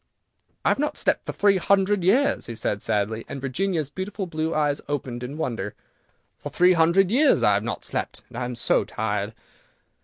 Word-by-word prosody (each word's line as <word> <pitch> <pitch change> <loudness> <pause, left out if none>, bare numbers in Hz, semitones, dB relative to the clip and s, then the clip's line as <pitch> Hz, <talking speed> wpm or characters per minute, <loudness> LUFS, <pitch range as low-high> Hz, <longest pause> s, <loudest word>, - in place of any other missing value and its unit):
"I - - +5
have - - +1
not 295 +1 -1
slept - - 0
for - - -1
three 200 -1 +3
hundred 195 +1 +2
years," 245 +11 +2
he 115 - -6
said 105 -2 -2
sadly, 110 +2 -1
and 140 - -5
Virginia's 155 +2 -2
beautiful 195 +3 -4
blue 160 -2 -2
eyes 150 -2 0
opened 130 -4 -3
in 130 +4 -6
wonder; 125 -7 -3 0.6
"for - - -6
three 180 +1 +4
hundred 175 +3 +3
years 280 +5 +4
I 105 - +5
have 100 +1 +1
not 115 - -4
slept, - - -4
and - - -14
I 125 - -2
am 125 0 -4
so 115 - +2
tired." 105 -1 -2
155 Hz, 190 wpm, -24 LUFS, 120-195 Hz, 0.6 s, I